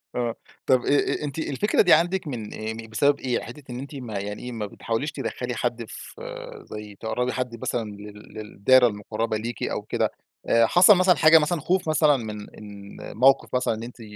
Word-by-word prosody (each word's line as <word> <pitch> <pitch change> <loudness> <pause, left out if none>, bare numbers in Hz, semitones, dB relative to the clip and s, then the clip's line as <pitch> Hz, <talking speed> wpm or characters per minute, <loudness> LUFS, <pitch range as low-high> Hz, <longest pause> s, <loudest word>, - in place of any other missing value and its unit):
آه، 120 -2 -1 0.3
طب 130 -2 +4
أ 145 - +1
أ - - -5
أنتِ 145 +2 -4
الفكرة 160 +8 +1
دي 175 - +6
عندِك 175 +2 +2
من 115 -6 -5
أيّام 110 +1 -5
إيه، 115 - -8
بسبب 140 +6 +2
إيه؟ 125 -2 -1
حتّة 130 +5 -10
إن 120 - -5
أنتِ 140 +2 -8
ما 115 -7 -5
يعني 105 +1 -6
إيه، 125 - -5
ما 110 -3 -4
بتحاوليش 115 +7 -3
تدخلي 125 -3 -4
حد 120 0 -2
ف 465 - -10 0.5
زي 105 -1 -8
تقربي 125 +3 -2
حد 125 -3 -4
مثلًا 115 -3 -2
لل 105 0 -12
للدايرة 110 +4 +3
المقربة 110 +1 -3
ليكِ 115 +2 -5
أو - - -2
كده، - - -1 0.4
حصل 175 - +6
مثلًا 180 0 +5
حاجة 160 0 +7
مثلًا 155 +2 0
خوف 180 +1 0
مثلًا 150 -2 +4
من 110 -3 -6 0.2
من 100 -1 -11 0.2
موقف 130 +2 +3
مثلًا 125 -2 +1
إن 110 +1 -6
أنتِ 120 0 -10
120 Hz, 195 wpm, -24 LUFS, 110-145 Hz, 0.5 s, حاجة